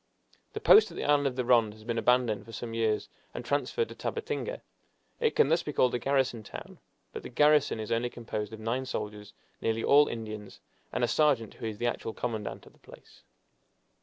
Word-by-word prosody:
The - - -4
post 435 - +7
at - - -11
the - - -3
island 145 -1 +3
of 130 - -3
the 125 -1 -1
Ronde 115 -4 +4
has 110 - -15
been 115 0 -2
abandoned 125 -4 +2
for 115 - -11
some 115 +1 -6
years, 110 -2 0 0.3
and - - -5
transferred 460 -1 0
to - - -8
Tabatinga. 480 +2 -4 0.6
It 460 -2 +1
can 140 - +4
thus 165 +2 +3
be 150 - -5
called 125 -2 +3
a 125 - 0
garrison 130 -3 +1
town, 105 - -10 0.3
but - - -5
the - - -8
garrison 150 -2 +3
is 110 - -5
only 115 +1 +1
composed 110 -3 -5
of 110 - -8
nine 120 +4 -2
soldiers, 105 -3 -5 0.3
nearly 115 0 0
all 145 +1 +6
Indians, 110 -3 -7 0.3
and - - -1
a - - +4
sergeant, 130 -4 +2
who 115 - -6
is 110 -2 -5
the 120 - -2
actual 115 -1 -2
commandant 110 -4 -4
of - - -17
the - - -26
place. - - -16
120 Hz, 210 wpm, -29 LUFS, 110-140 Hz, 0.6 s, post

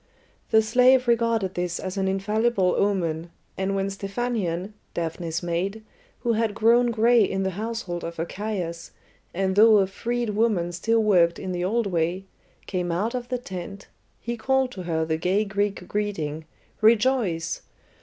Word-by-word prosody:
The 220 -1 +5
slave 255 +3 +4
regarded 230 -5 +1
this 175 -1 -2
as 185 0 -5
an 195 -1 0
infallible 200 0 +1
omen, 170 -5 0 0.3
and 195 +1 -1
when 195 0 0
Stephanion, 195 -2 -3 0.2
Daphne's 165 0 -3
maid, 185 +5 -2 0.4
who 235 -1 +1
had 220 -2 0
grown 235 +2 +4
gray 230 0 +4
in 195 0 -1
the 190 - 0
household 210 -3 -4
of 170 0 -6
Archias, 175 -1 -4 0.4
and 190 +1 -1
though 215 +1 +7
a 195 - +4
freed 235 +4 -2
woman 205 -5 +1
still 225 +6 +1
worked 175 -5 +4
in 190 - -5
the 175 -1 -2
old 225 +5 +1
way, 175 0 -1 0.4
came 180 -2 -2
out 205 +8 -1
of 245 -1 -4
the 250 - 0
tent, 190 -4 -8 0.3
he 235 0 -4
called 265 +3 +1
to 190 - -7
her 160 -2 -1
the 160 0 -1
gay 185 +5 +1
Greek 200 -2 -2
greeting, 160 -7 -3 0.4
"Rejoice!" 215 -7 +2
195 Hz, 155 wpm, -25 LUFS, 175-225 Hz, 0.4 s, though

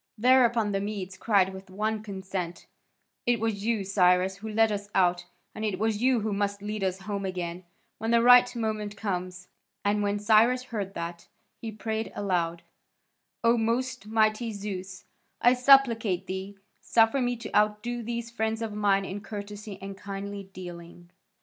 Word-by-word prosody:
Thereupon 235 -2 +4
the 195 0 -1
Medes 200 -2 -4
cried 190 -2 +2
with 190 0 -10
one 215 +3 -2
consent: 190 -4 -5 0.6
"It 240 -1 +3
was 215 -2 -2
you, 225 -2 0
Cyrus, 185 -1 +3
who 220 +2 -7
led 220 +1 +3
us 205 0 -4
out, 175 -2 +2 0.3
and 215 - -6
it 205 -4 -1
is 220 0 0
you 255 -2 +3
who 215 0 -1
must 200 0 -2
lead 210 -1 -3
us 190 0 -1
home 200 0 -4
again, 180 -1 -4 0.3
when 225 +1 -2
the 235 0 +4
right 245 0 +7
moment 215 -2 -3
comes." 185 -3 -4 0.4
And 205 +1 +2
when 205 0 0
Cyrus 225 +4 +4
heard 205 -6 -5
that, 170 0 -6 0.3
he 225 - -5
prayed 220 +1 -3
aloud: 170 -4 -1 0.8
"O 230 0 +4
most 235 0 -1
mighty 220 +1 +1
Zeus, 195 -2 -6 0.3
I 245 - +5
supplicate 240 -8 +4
thee, 190 +2 -6 0.2
suffer 225 +4 +3
me 245 0 0
to 235 -2 -7
outdo 210 +3 +1
these 235 0 -4
friends 220 0 -1
of 220 -2 -4
mine 200 -2 +2
in 195 +2 -5
courtesy 205 -1 -7
and 195 0 -6
kindly 200 0 -7
dealing." 175 -1 -10
205 Hz, 160 wpm, -27 LUFS, 190-225 Hz, 0.8 s, right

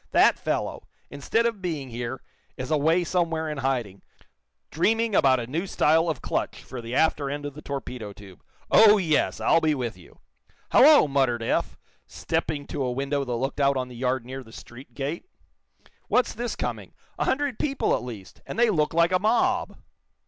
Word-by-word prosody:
That - - +5
fellow, - - -3 0.2
instead 145 +11 0
of 230 -4 -1
being 155 -7 -4
here, 120 +2 -5 0.3
is 130 +2 -5
away 160 +4 +3
somewhere 165 -2 -1
in 150 -2 -4
hiding, 125 -8 -2 0.7
dreaming 225 +6 +1
about 135 -7 +4
a 120 - -4
new 160 +10 -3
style 165 0 +2
of 155 -6 -4
clutch - - -3
for 125 - -8
the 115 +2 -5
after 150 -3 +2
end 145 +1 -4
of 145 - -5
the 150 - -10
torpedo 125 -7 -6
tube. 100 -2 -14 0.3
Oh, 215 -1 +7
yes, 160 -6 +1
I'll 165 - +3
be 155 -1 +2
with 120 -6 -3
you!" 90 -2 -18 0.5
"Hallo!" 290 - +7
muttered 130 -4 +1
Eph, - - -1 0.3
stepping 145 -2 -3
to - - -5
a 125 -2 0
window 140 +2 -1
that 125 - -5
looked 135 +5 -3
out 140 -1 +3
on 130 -1 -3
the 125 - -11
yard 125 0 -1
near 130 +2 -7
the 115 - -16
street 120 +4 -13
gate. 145 +4 -4 0.8
"What's 250 - +2
this 240 +1 -4
coming? - - -5 0.3
A - - +1
hundred 275 -3 -1
people, 275 -2 0
at - - -3
least, 110 -6 -10
and - - -6
they 235 -1 +4
look 155 -3 0
like 170 +1 +4
a 185 - +3
mob!" 220 +5 +1
145 Hz, 185 wpm, -25 LUFS, 125-170 Hz, 0.8 s, Oh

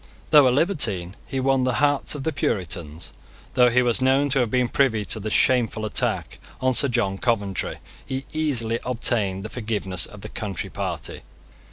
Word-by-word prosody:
Though 145 -3 +8
a - - +5
libertine, 125 - 0
he 135 - -3
won 135 0 +2
the 125 -1 +1
hearts 145 +4 +1
of 140 - -5
the 160 - 0
Puritans. 85 - -3 0.4
Though 125 -1 +5
he 125 +1 +3
was 120 +1 +2
known 135 +2 +3
to 135 - +4
have 120 -3 +1
been 125 +1 +2
privy 115 -6 +1
to 110 - 0
the 110 +1 -4
shameful 115 -2 +2
attack 105 - -2 0.2
on 130 0 +2
Sir 140 - +5
John 115 -6 -1
Coventry, 100 -6 -1 0.3
he 130 +1 -5
easily 125 -8 0
obtained 110 -6 0
the 110 - -6
forgiveness 105 -7 -1
of 105 - -12
the 105 - -8
Country 100 -5 -5
Party. - - -4
120 Hz, 180 wpm, -23 LUFS, 105-130 Hz, 0.4 s, Though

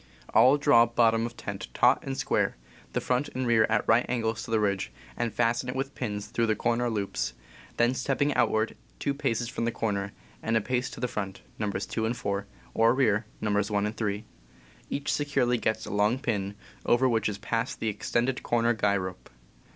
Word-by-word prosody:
All 130 +3 +7
draw 120 -5 +5
bottom 115 -1 +3
of 120 - -12
tent 100 -1 -5
taut 125 +2 +4
and 135 -1 -4
square, - - 0 0.4
the - - +1
front 125 +3 0
and 130 0 -1
rear 115 -2 +4
at 105 -1 +1
right 115 +2 +5
angles 115 -2 -1
to - - -8
the 110 -1 +2
ridge, 100 -2 0 0.2
and 120 -1 -1
fasten 120 +3 +1
it 125 - -3
with 135 +1 -2
pins 105 -4 -3
through 115 -1 0
the 110 - +2
corner 120 +2 +1
loops, 100 - -2 0.4
then 120 +1 +3
stepping 140 +2 0
outward 110 -3 +1 0.2
two 140 - -1
paces 125 -5 -1
from 115 -1 -3
the 115 - +1
corner, 100 -3 -2 0.3
and 115 0 +1
a - - +1
pace 125 +3 -1
to - - -9
the 125 - 0
front 100 -4 -4 0.2
(Nos. 100 -2 -1
2 110 -1 -2
and 120 +2 -2
4) 100 -2 -2 0.3
or 115 +2 +4
rear 110 -5 +2
(Nos. 105 -1 +1
1 100 -1 +1
and 105 +1 -3
3), 105 -1 -2 0.6
each 140 +1 -1
securely 135 -5 +1
sets 110 - 0
a 105 - -6
long 105 +4 +2
pin, 105 -6 -2 0.3
over 125 +2 +4
which 115 -3 +1
is 100 - -4
passed 115 +3 -2
the 115 - -2
extended 120 +5 -1
corner 120 0 +2
guy 100 -2 +2
rope. 95 -1 -6
115 Hz, 200 wpm, -28 LUFS, 105-125 Hz, 0.6 s, All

